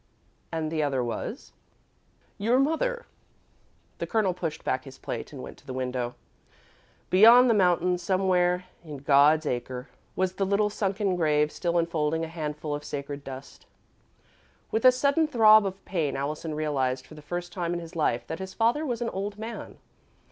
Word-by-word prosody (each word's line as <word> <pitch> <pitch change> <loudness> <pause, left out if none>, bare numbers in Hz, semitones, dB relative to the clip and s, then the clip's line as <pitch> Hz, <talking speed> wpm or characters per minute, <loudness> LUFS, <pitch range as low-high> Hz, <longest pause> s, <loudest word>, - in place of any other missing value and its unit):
"And 160 -1 -2
the 160 -1 0
other 135 -4 0
was 120 - -5 0.4
" - - -38
"Your 245 - +5
mother." 395 - 0 0.9
The - - -3
Colonel 215 -5 +1
pushed 165 -3 -5
back 130 0 -1
his 135 -1 -12
plate 115 - -6
and 135 -4 -8
went - - -10
to 145 - -24
the 130 - -5
window. 125 -1 -3 1.0
Beyond 230 +6 +8
the 235 - +4
mountains, 180 -2 +2
somewhere 180 -1 +1 0.2
in 150 -3 -8
"God's 145 +3 +4
acre," 125 0 -4 0.3
was 185 0 0
the 195 - +1
little 205 +1 +2
sunken 195 -2 -1
grave 150 -3 +2
still 175 -1 -1
enfolding 160 -1 0
a - - -9
handful 150 -2 -4
of 145 0 -4
sacred 140 0 -6
dust. 135 0 -10 1.0
With 220 +3 0
a 255 - +10
sudden 280 +5 +2
throb 220 -6 +6
of 190 0 -8
pain, 160 -7 -1
Allison 150 +3 -3
realised, 135 -4 -1
for 155 - -14
the 150 - -11
first 175 +3 -5
time 175 -3 -2
in 175 - -2
his 170 +1 -10
life, 120 -7 0
that 160 - -6
his 190 0 -7
father 235 +7 +2
was 245 -5 -2
an 230 - -1
old 200 +2 -4
man. 225 +2 -7
170 Hz, 175 wpm, -27 LUFS, 145-200 Hz, 1.0 s, a